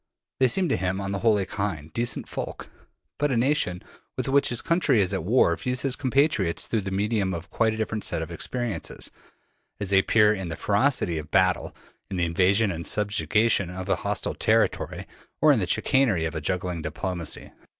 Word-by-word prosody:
They 130 Hz, -, +5 dB
seem 180 Hz, +9 st, +1 dB
to -, -, +1 dB
him 95 Hz, +1 st, -1 dB
on 100 Hz, 0 st, -3 dB
the 100 Hz, -, -2 dB
whole 110 Hz, -1 st, +3 dB
kindly, 95 Hz, -6 st, -4 dB
decent 120 Hz, 0 st, -2 dB
folk. -, -, -6 dB, 0.5 s
But 145 Hz, 0 st, +2 dB
a 130 Hz, -, 0 dB
nation 120 Hz, -8 st, 0 dB, 0.3 s
with -, -, -2 dB
which 140 Hz, +1 st, +3 dB
his 120 Hz, -, 0 dB
country 165 Hz, -8 st, +2 dB
is 95 Hz, -3 st, +1 dB
at -, -, -2 dB
war 95 Hz, -3 st, +3 dB
views 125 Hz, +8 st, -3 dB
his 135 Hz, -2 st, +1 dB
compatriots 130 Hz, -, +1 dB
through 110 Hz, -, -1 dB
the 95 Hz, -, -4 dB
medium 100 Hz, -1 st, 0 dB
of 85 Hz, 0 st, -6 dB
a -, -, -30 dB
quite 110 Hz, -1 st, +1 dB
different 110 Hz, -1 st, -3 dB
set 80 Hz, -, -1 dB
of 80 Hz, -, -8 dB
experiences: 120 Hz, +6 st, -3 dB, 0.7 s
as 100 Hz, -2 st, -1 dB
they 95 Hz, -, +6 dB
appear 105 Hz, +1 st, +4 dB
in 95 Hz, -4 st, -5 dB
the 80 Hz, -, -4 dB
ferocity 100 Hz, -, +1 dB
of 75 Hz, -1 st, -9 dB
battle, 90 Hz, 0 st, +1 dB, 0.3 s
in 95 Hz, -, -4 dB
the 85 Hz, -, +1 dB
invasion 95 Hz, +5 st, +2 dB
and 85 Hz, -1 st, -5 dB
subjugation 105 Hz, -1 st, +1 dB
of 90 Hz, +1 st, -6 dB
a -, -, +2 dB
hostile -, -, -2 dB
territory, -, -, 0 dB, 0.3 s
or -, -, +6 dB
in -, -, +3 dB
the -, -, -1 dB
chicanery 110 Hz, -12 st, +2 dB
of 80 Hz, -, -3 dB
a 80 Hz, -, -4 dB
juggling 90 Hz, +1 st, -2 dB
diplomacy. 85 Hz, +2 st, -3 dB
100 Hz, 195 wpm, -25 LUFS, 90-115 Hz, 0.7 s, they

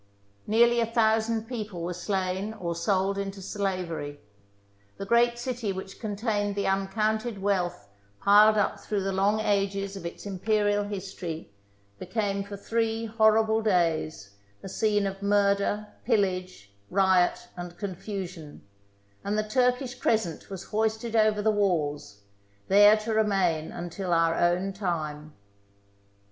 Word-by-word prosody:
Nearly 235 Hz, +2 st, +4 dB
a 230 Hz, -, +1 dB
thousand 225 Hz, -1 st, +1 dB
people 215 Hz, -8 st, -5 dB
were 175 Hz, +1 st, -2 dB
slain 190 Hz, +2 st, -2 dB
or 175 Hz, -5 st, -3 dB
sold 190 Hz, +3 st, 0 dB
into 195 Hz, 0 st, -4 dB
slavery; 180 Hz, -7 st, -3 dB, 0.8 s
the 195 Hz, -, -5 dB
great 235 Hz, +3 st, +3 dB
city 240 Hz, -3 st, -3 dB
which 190 Hz, 0 st, -7 dB
contained 205 Hz, -1 st, -1 dB
the 200 Hz, -, -1 dB
un 195 Hz, 0 st, +1 dB
counted 215 Hz, +1 st, -1 dB
wealth 190 Hz, -, -1 dB, 0.3 s
piled 210 Hz, +2 st, +6 dB
up 205 Hz, 0 st, +1 dB
through 200 Hz, 0 st, -2 dB
the 195 Hz, -, -1 dB
long 200 Hz, +3 st, +2 dB
ages 200 Hz, -1 st, 0 dB
of 195 Hz, -, -8 dB
its 170 Hz, +3 st, -7 dB
Imperial 205 Hz, +1 st, +1 dB
history 185 Hz, -, -6 dB, 0.5 s
became 200 Hz, 0 st, -2 dB
for 200 Hz, 0 st, -8 dB
three 225 Hz, +2 st, -1 dB
horrible 220 Hz, 0 st, +3 dB
days 165 Hz, -, 0 dB, 0.3 s
a -, -, -6 dB
scene 205 Hz, 0 st, +1 dB
of 195 Hz, 0 st, -4 dB
murder, 200 Hz, +1 st, +2 dB, 0.2 s
pillage, 185 Hz, -, -1 dB, 0.2 s
riot, 190 Hz, -2 st, +2 dB
and 175 Hz, -1 st, -8 dB
confusion, 185 Hz, -5 st, -6 dB, 0.6 s
and 205 Hz, +1 st, -1 dB
the 215 Hz, -, +1 dB
Turkish 250 Hz, +2 st, +1 dB
Crescent 215 Hz, -11 st, -1 dB
was 190 Hz, -2 st, -6 dB
hoisted 220 Hz, +1 st, -1 dB
over 215 Hz, -1 st, +3 dB
the 220 Hz, -, +4 dB
walls, 150 Hz, -, -1 dB, 0.5 s
there 205 Hz, +2 st, +7 dB
to 220 Hz, +1 st, -3 dB
remain 190 Hz, -7 st, +1 dB
until 175 Hz, +1 st, -4 dB
our 165 Hz, 0 st, +3 dB
own 175 Hz, +3 st, +1 dB
time. 155 Hz, -6 st, -4 dB
200 Hz, 130 wpm, -27 LUFS, 185-215 Hz, 0.8 s, there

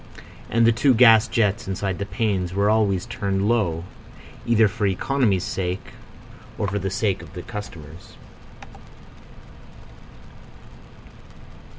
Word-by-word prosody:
And 115 Hz, 0 st, +3 dB
the 115 Hz, -, +6 dB
two 130 Hz, +3 st, +3 dB
gas 115 Hz, -1 st, +6 dB
jets 105 Hz, -5 st, 0 dB
inside 95 Hz, -1 st, -3 dB
the 100 Hz, -, -4 dB
panes 95 Hz, -5 st, -2 dB
were 100 Hz, +1 st, +2 dB
always 100 Hz, -4 st, +1 dB
turned 100 Hz, 0 st, -2 dB
low, 95 Hz, -8 st, 0 dB, 0.6 s
either 115 Hz, -2 st, +4 dB
for 100 Hz, +1 st, -2 dB
economy's 100 Hz, -1 st, 0 dB
sake 90 Hz, -1 st, -4 dB, 0.7 s
or 105 Hz, -, -1 dB
for 100 Hz, +1 st, -2 dB
the 95 Hz, 0 st, -3 dB
sake 95 Hz, 0 st, -1 dB
of -, -, -13 dB
the 90 Hz, -2 st, -7 dB
customers. 85 Hz, -6 st, -10 dB
100 Hz, 115 wpm, -23 LUFS, 95-110 Hz, 0.7 s, the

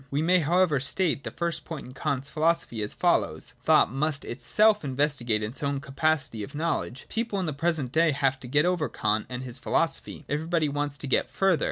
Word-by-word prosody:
We 145 Hz, +3 st, 0 dB
may 180 Hz, +2 st, +4 dB
therefore 165 Hz, -1 st, +3 dB
state 150 Hz, +2 st, 0 dB
the -, -, -4 dB
first 170 Hz, -1 st, -2 dB
point 160 Hz, -4 st, -7 dB
in 125 Hz, -, -11 dB
Kant's 135 Hz, 0 st, -2 dB
philo 160 Hz, +2 st, +3 dB
sophy 120 Hz, -9 st, -7 dB
as 105 Hz, -, -3 dB
follows: -, -, 0 dB
Thought -, -, +4 dB
must 145 Hz, +2 st, -1 dB
itself 210 Hz, -, +2 dB
investigate 130 Hz, -5 st, 0 dB
its 115 Hz, +5 st, -6 dB
own 140 Hz, -1 st, -1 dB
capacity 140 Hz, -4 st, -1 dB
of 100 Hz, -, -7 dB
knowledge. 155 Hz, -4 st, -2 dB
People 225 Hz, -3 st, -2 dB
in 185 Hz, -, -1 dB
the 155 Hz, -, -2 dB
present 145 Hz, -3 st, 0 dB
day 165 Hz, +3 st, +4 dB
have 135 Hz, -2 st, +1 dB
got 150 Hz, +4 st, +3 dB
over 180 Hz, -4 st, +1 dB
Kant 105 Hz, 0 st, -1 dB
and 125 Hz, 0 st, -5 dB
his 125 Hz, 0 st, -7 dB
philosophy: 165 Hz, -2 st, -1 dB
everybody 160 Hz, +2 st, 0 dB
wants 145 Hz, 0 st, -2 dB
to 140 Hz, -, -6 dB
get 130 Hz, -, +1 dB
further. 190 Hz, -4 st, +2 dB
145 Hz, 200 wpm, -27 LUFS, 130-165 Hz, -, may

